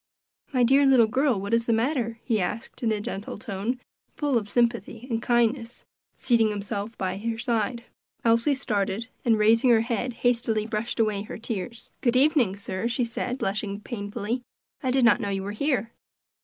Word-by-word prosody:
"My 255 -3 +3
dear 270 +4 +5
little 265 -4 +6
girl, 255 0 +1
what 200 +3 -4
is 230 0 +2
the 230 - +3
matter?" 230 -1 0
he 220 -5 +1
asked 210 +5 -4
in 230 -2 +1
a 215 - 0
gentle 205 0 -5
tone, 210 +4 -3 0.4
full 290 -3 0
of 210 -3 0
sympathy 235 0 0
and 225 0 0
kindness, 235 0 0 0.3
seating 230 -3 +3
himself 205 +1 -4
by 190 0 -2
her 225 +1 -2
side. 235 0 -1 0.4
Elsie 230 +5 +4
started, 215 -2 -1
and 230 -2 +3
raising 225 +4 +4
her 230 -2 +6
head, 240 +1 -2
hastily 230 -3 +2
brushed 220 +2 -3
away 215 -3 +1
her 210 - -7
tears. 230 +1 -5
"Good 240 -2 +2
evening, 260 - +4
sir," 200 +1 -3
she 240 +1 0
said, 245 +2 -3
blushing 200 -2 -2
painfully, 215 +2 -4 0.4
"I 260 - -1
did 255 -1 +3
not 235 +1 +5
know 205 - -2
you 195 -1 -2
were 200 - -4
here." 235 -1 0
230 Hz, 180 wpm, -26 LUFS, 210-245 Hz, 0.4 s, little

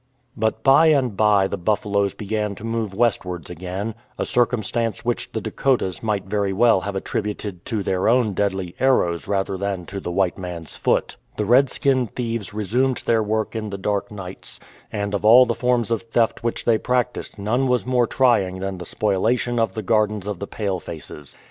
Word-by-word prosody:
But 110 0 -1
by 140 +4 +6
and 135 -8 +3
by 105 -2 +4
the 100 - -4
buffaloes 100 +1 0
began 105 0 -2
to 105 - -12
move 115 -2 -2
westwards 90 -7 0
again 95 +5 -4
— - - -36
a - - -1
circumstance 115 -2 0
which 120 0 -2
the - - -3
Dakotas 120 -10 0
might 105 -4 -1
very 100 0 0
well 110 -1 +4
have 100 +1 -4
attributed 100 -2 -4
to 110 -5 -2
their 95 +2 +1
own 120 -3 +3
deadly 95 -2 -1
arrows 105 -11 +2
rather 95 -1 -1
than 95 -2 -3
to 100 +3 -6
the 90 - -5
white 95 +1 0
man's 85 -3 -7
foot. - - 0 0.2
The 105 - 0
redskin 130 +2 +3
thieves 115 -3 -4
re 105 0 -4
sumed 125 +5 +1
their 115 -1 +3
work 110 +1 -1
in 110 -1 -3
the 100 - -5
dark 100 +1 -1
nights; 95 -3 -7 0.3
and 100 0 -3
of 100 - -1
all 120 +4 +8
the 120 - 0
forms 120 -2 0
of 115 - +1
theft 115 0 0
which 115 - -2
they 115 -2 +3
practised 125 -1 -1
none 120 +6 0
was 125 -1 +1
more 125 -2 +2
trying 105 -9 +2
than 95 -1 -4
the 90 - -7
spoliation 115 +4 +1
of 115 -4 0
the 110 - -3
gardens 105 -2 +1
of 105 -4 -4
the 100 - -5
palefaces. 85 -8 -5
105 Hz, 190 wpm, -22 LUFS, 95-115 Hz, 0.3 s, all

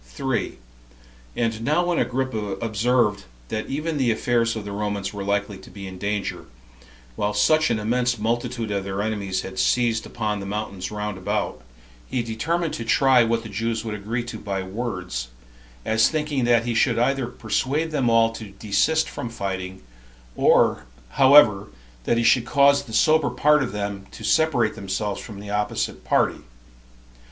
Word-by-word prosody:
3. 120 - -3 0.8
And 115 -1 -1
now 155 +8 +2
when 175 -1 +1
Agrippa 115 -6 -1
observed 110 -1 +1 0.2
that 110 - -3
even 150 +2 -2
the 130 -3 +2
affairs 115 +1 +1
of 110 -2 -5
the 100 - -5
Romans 100 -1 -3
were 100 -1 -5
likely 100 0 -1
to 95 - -14
be 100 -1 -9
in 95 -1 -8
danger, 100 +1 -3 0.7
while 105 +6 -1
such 155 +9 +3
an 115 - +1
immense 120 +3 0
multitude 115 0 -2
of 100 -1 -1
their 100 +1 -3
enemies 100 -4 -2
had 125 - -7
seized 120 -3 +1
upon 105 -3 -2
the 100 - -6
mountains 100 -2 -4
round 105 -2 -4
about, 90 - -2 0.5
he 125 - -1
determined 160 +9 -2
to 115 - -4
try 130 +1 +4
what 115 0 0
the 110 - -8
Jews 115 +2 -2
would 110 - -3
agree 110 +4 -3
to 120 -2 -7
by 95 -2 -3
words, 95 - -4 0.6
as 110 0 +3
thinking 150 -5 -1
that 120 -1 +3
he 120 - -1
should 115 +1 +2
either 135 +1 +1
persuade 135 +7 -1
them 135 -6 +1
all 115 0 +4
to 115 -1 -8
desist 105 +11 +1
from 120 - -5
fighting, 95 -4 -5 0.5
or, 65 - +3 0.2
however, 120 - +6 0.4
that 120 - +2
he 115 - +1
should 120 0 +4
cause 140 +1 +4
the 115 - -11
sober 155 +5 +4
part 150 0 +3
of 130 - -2
them 100 -1 -4
to - - -10
separate 140 -9 +2
themselves 100 +1 -3
from 105 -4 -9
the 100 0 -8
opposite 105 0 -2
party. - - +1
115 Hz, 170 wpm, -23 LUFS, 100-125 Hz, 0.8 s, however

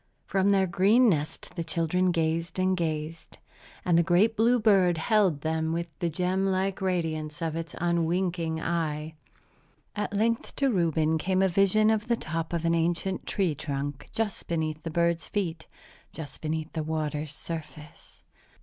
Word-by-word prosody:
From 195 0 +1
their 195 -1 +4
green 205 +7 +4
nest 155 -5 -2
the 170 - -2
children 165 +3 +1
gazed 165 0 -1
and 185 0 +2
gazed; 160 -1 -4 0.5
and 170 -2 +4
the - - +4
great 190 +6 +3
blue 235 +3 +4
bird 195 -6 +4
held 185 -4 +2
them 160 +1 -1
with 170 +1 -1
the 170 -3 0
gem 185 +4 0
like 190 0 0
radiance 160 -5 -2
of 165 -2 -2
its 165 0 -5
unwinking 170 -1 0
eye. 160 -2 -2 0.8
At 205 -1 -2
length 230 +2 0
to 275 -1 +2
Reuben 160 -4 +1
came 185 +3 +1
a - - +5
vision 200 +4 +4
of 220 0 0
the 235 -1 +2
top 165 -3 -4
of 170 -1 -2
an 165 - +3
ancient 175 +3 -1
tree 185 -6 +1
trunk 145 -2 -4
just 220 -2 -3
beneath 160 -2 -2
the 165 - -5
bird's 170 0 0
feet, 170 -5 -3 0.4
just 145 -5 -8
beneath 155 0 -3
the 160 - -2
water's 155 -1 -2
surface. 155 -2 -9
170 Hz, 160 wpm, -27 LUFS, 160-190 Hz, 0.8 s, a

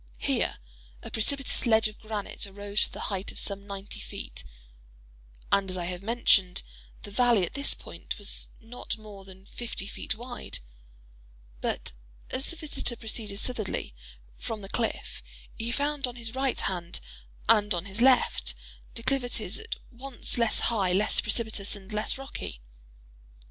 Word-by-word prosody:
Here - - +1 0.5
a - - -6
precipitous 270 +3 +2
ledge 220 -1 +6
of 215 - -10
granite 215 -2 -3
arose 200 +1 +1
to - - -9
a - - -4
height 195 -1 -2
of - - -9
some 200 0 0
ninety 200 0 -5
feet; - - -6 1.1
and, 195 -1 +4
as 185 - -1
I 175 - -1
have 180 0 -3
mentioned, 200 -4 +4 0.4
the 205 - -8
valley 235 -4 +5
at - - -8
this 280 +1 +4
point - - -6
was - - -2
not 230 +1 -4
more 210 -3 -10
than 190 0 -13
fifty 235 -3 -4
feet 205 - -1
wide; 245 +2 -5 1.0
but - - -1 0.4
as 265 - +1
the - - -4
visitor 310 -6 0
proceeded 220 -3 -3
southwardly 215 - -1 0.5
from 220 -2 -3
the 195 - -8
cliff, 225 0 -1 0.3
he 230 +1 -2
found 285 +2 +1
on 245 - -6
his 230 -1 -4
right 265 0 +2
hand 175 -2 -1 0.5
and 210 0 +6
on 170 +1 -2
his 200 +3 -3
left, 245 - +5 0.4
declivities 245 -5 +1
at 450 +1 -3 0.2
once 255 +1 -1
less 235 -2 +3 0.2
high, 190 -5 +3
less 205 +3 +5
precipitous, 210 -2 +2
and 200 +1 -10
less 210 +4 +1
rocky. 270 - -6
215 Hz, 155 wpm, -29 LUFS, 195-245 Hz, 1.1 s, ledge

